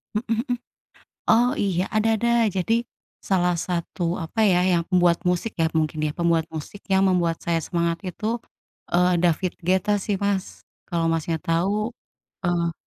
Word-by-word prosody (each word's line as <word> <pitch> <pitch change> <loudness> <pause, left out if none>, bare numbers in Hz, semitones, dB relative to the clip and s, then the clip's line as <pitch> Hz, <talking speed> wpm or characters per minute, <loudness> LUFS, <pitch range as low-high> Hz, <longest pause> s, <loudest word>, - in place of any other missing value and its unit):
Mhm 220 - -1 0.2
mhm. 245 - +2 0.7
Oh, 245 +4 +5
iya 190 - 0
ada 220 +1 +3
ada 235 +2 0 0.2
jadi 190 +4 0 0.6
salah 180 -2 +3
satu, 170 0 -2
apa 185 +6 -2
ya, 180 -4 +4
yang 175 -2 +3
pembuat 175 -2 +3
musik 180 +5 -1
ya 160 - +3
mungkin 155 0 0
ya 155 - +1
pembuat 170 -1 +1
musik 160 +6 -8
yang 190 0 +4
membuat 175 -3 +2
saya 165 -1 +1
semangat 170 -1 -1
itu, 210 - -8 0.6
eee, 180 +1 +3
David 175 +1 +1
Guetta 190 +4 +2
sih 200 -1 -1
Mas 200 -1 0 0.4
kalo 170 -2 0
Masnya 165 0 -1
tau, 200 +8 0 0.5
eee 170 -1 +1
180 Hz, 155 wpm, -24 LUFS, 170-200 Hz, 0.7 s, Oh